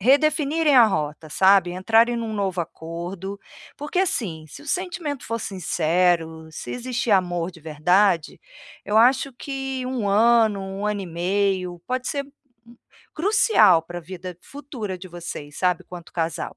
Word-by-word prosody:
redefinirem 300 - +3
a 240 -3 +8
rota, 155 -4 -3
sabe, 190 +2 +4
entrarem 225 +6 +3
em - - -2
um 220 -1 -4
novo 195 -3 -2
acordo. 175 +4 -6 0.4
Porque 295 +5 -3
assim, 185 - -1
se 290 - -11
o - - -15
sentimento 340 -5 -3
for 230 - -2
sincero, 170 -4 0
se 155 - -8
existe 245 -2 -3
amor 175 -3 +1
de 165 -3 -16
verdade, 165 +3 +1 0.4
eu 210 - 0
acho 260 +4 +4
que 270 0 -4
1 245 -6 -2
ano, 220 0 +4
1 195 +2 -4
ano 210 -1 -1
e 185 - -7
meio, 180 +1 -1
pode 255 0 -2
ser 280 -2 -2 0.9
crucial 305 - +4
para 175 +1 -7
vida 180 +1 -8
futura 255 -9 -7
de 185 - -9
vocês, 165 -4 -8
sabe, 180 -1 +1
quanto 175 -1 -11
casal. 165 -2 -3
195 Hz, 150 wpm, -23 LUFS, 175-250 Hz, 0.9 s, a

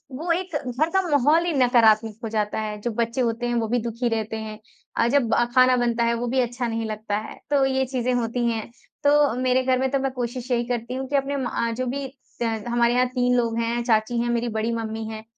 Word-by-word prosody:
वो 335 +5 -2
एक 345 -2 -1
घर 275 +4 -1
का 385 - +5
माहौल 295 +4 +3
ही 345 - 0
नकारात्मक 225 -5 +4
हो 225 - -3
जाता 215 -1 -1
है, 210 -1 -4
जो 240 - -2
बच्चे 235 +3 -1
होते 235 0 -1
हैं, 240 - -1
वो 230 -1 0
भी 245 +2 +1
दुखी 235 +1 -2
रहते 220 -1 -2
हैं। 215 -1 -7 0.4
अ, 230 - +3
जब 245 -2 +2 0.2
खाना 255 0 +6
बनता 235 -1 +1
है, 235 0 +2
वो 240 +1 -2
भी 260 +2 0
अच्छा 245 0 -1
नहीं 225 0 -2
लगता 215 -1 -3
है, 215 - -7
तो 285 -2 +3
ये 265 0 +1
चीज़ें 255 -1 -1
होती 240 0 -1
हैं, 225 -2 -4 0.3
तो 290 -1 +4
मेरे 255 0 +2
घर 255 0 +2
में 265 0 +1
तो 275 - +1
मैं 270 0 -1
कोशिश 250 0 -5
यही 240 -1 +2
करती 245 0 -3
हूँ 265 +1 -4
कि 285 - -2
अपने 280 0 0
मा 245 -3 -1
जो 255 - -1
भी 275 +2 -3 0.3
त - - +2 0.2
हमारे 235 0 +2
यहाँ 250 +1 +3
3 250 0 +1
लोग 230 -1 0
हैं 235 +1 -1
चाची 230 0 +1
हैं, 240 - -1
मेरी 240 0 0
बड़ी 220 +1 -1
मम्मी 225 -1 -4
हैं 220 0 -7
240 Hz, 240 wpm, -24 LUFS, 230-260 Hz, 0.4 s, खाना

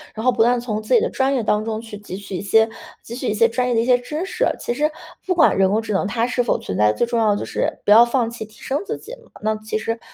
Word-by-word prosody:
然 220 - -5
后 255 - +4
不 235 -2 0
断 240 +2 +4
地 240 - -3
从 215 -3 -3
自 215 - -2
己 - - +7
的 485 - 0
专 265 +1 0
业 245 - 0
当 210 0 +1
中 220 -1 -3
去 220 -2 -9
汲 200 -2 -8
取 195 -2 -6
一 - - -5
些， 220 +2 +4 0.4
汲 235 +2 -7
取 255 - -3
一 - - +1
些 230 +2 +4
专 250 +2 -1
业 250 - +1
的 225 - +3
一 - - -1
些 250 0 +5
知 300 +8 -5
识。 455 +5 -1
其 - - -2
实 300 +5 +1 0.4
不 365 - 0
管 325 -2 +4
人 190 -1 +4
工 215 +3 +1
智 225 - -6
能 195 0 0
它 230 +2 0
是 250 0 0
否 235 - +1
存 95 - -5
在， 105 0 +4
最 240 - 0
重 235 0 -1
要 220 -2 +3
的 205 - +1
就 - - -4
是 - - -2
不 - - +1
要 230 +3 +9
放 235 -1 0
弃 235 -2 -7
提 215 0 -20
升 275 +2 -2
自 - - -4
己。 450 - -12 0.3
那 215 0 0
其 215 0 -4
实 225 +1 -3
230 Hz, 350 characters per minute, -21 LUFS, 215-250 Hz, 0.4 s, 要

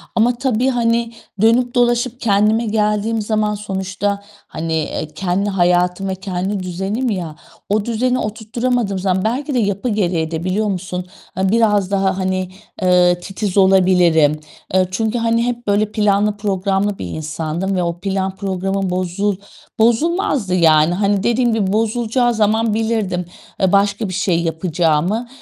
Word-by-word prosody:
ama 235 +2 +3
tabii, 255 0 +1
hani, 235 -2 +1 0.3
dönüp 240 +2 +3
dolaşıp 240 0 +1
kendime 215 +2 +2
geldiğim 210 +1 0
zaman 210 0 0
sonuçta, 200 0 -3 0.3
hani, 165 0 -4
eee, 155 -1 -2
kendi 195 +2 -1
hayatım 180 0 +1
ve 190 - -2
kendi 190 +1 -3
düzenim 195 +8 -2
ya, 175 -7 -3 0.3
o 210 +1 +1
düzeni 250 +2 0
oturtturamadığım 220 -1 -2
zaman 185 0 0
belki 265 +6 -1
de 250 - +2
yapı 200 +2 -1
gereği 175 -6 0
de 165 0 -3
biliyor 195 +4 0
musun 180 -2 -3 0.3
a 190 0 +1
biraz 210 -3 +2
daha, 195 -1 +1
hani, 185 -1 -1 0.3
eee, 180 -1 +4
titiz 195 +1 -4
olabilirim. 180 -5 +4 0.3
Eee, 185 0 +3
çünkü, 220 +4 -1
hani, 230 0 +1
hep 240 -1 -4
böyle 205 +1 +1
planlı 210 0 +1
programlı 195 0 -1
bir - - -4
insandım 160 - -3
ve 180 - 0
o 170 0 -3
plan 190 0 -2
programım 195 0 -2
bozul 185 +3 -1 0.4
bozulmazdı 235 - +1
yani. 160 -1 +4
Hani, 200 +1 +1
dediğim 240 0 +2
gibi 205 -3 0
bozulacağı 235 +2 +1
zaman 220 0 +1
bilirdim 215 -5 -1 0.4
e 190 -1 +3
başka 200 +1 +2
bir - - -5
şey 180 -2 +1
yapacağımı, 170 +5 0
200 Hz, 145 wpm, -18 LUFS, 185-225 Hz, 0.4 s, eee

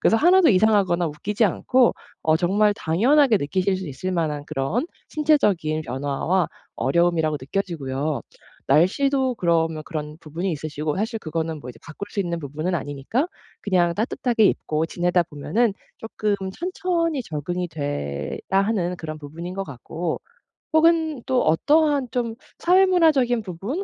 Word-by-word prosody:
그래서 225 - +4
하나도 355 +7 +5
이상하거나 190 -4 +3
웃기지 200 +9 -1
않고 245 +5 +3 0.3
어 160 0 +3
정말 200 +5 +3
당연하게 235 - +3
느끼실 185 +4 0
수 185 -3 -6
있을 185 +7 -4
만한 150 -4 -1
그런 135 - -1 0.2
신체적인 205 - +2
변화와 145 +6 -1 0.3
어려움이라고 160 +2 +2
느껴지고요. 145 -3 -2 0.5
날씨도 260 - +3
그러면 165 -4 +1
그런 150 -2 -5
부분이 170 +4 -3
있으시고 150 +1 -3
사실 225 +3 -2
그거는 160 -2 -3
뭐 125 - -10
이제 115 -2 -11
바꿀 165 +5 -8
수 205 - -2
있는 170 -3 -2
부분은 155 +4 -3
아니니까 145 - -2 0.3
그냥 180 -4 +2
따뜻하게 230 +2 +1
입고 155 -5 +1
지내다 175 +1 +1
보면은 195 +8 0 0.2
쪼끔 215 -2 -2 0.2
천천히 345 - -1
적응이 175 - -3
돼야 145 - -4
하는 195 -2 +1
그런 155 -2 -6
부분인 165 +5 -7
거 195 0 -3
같고. 160 +4 -5 0.5
혹은 315 -4 +3
또 260 -1 +2
어떠한 290 - +3
좀 235 -2 -2 0.2
사회문화적인 330 -10 +4
부분 205 - -4
180 Hz, 340 characters per minute, -23 LUFS, 155-235 Hz, 0.5 s, 하나도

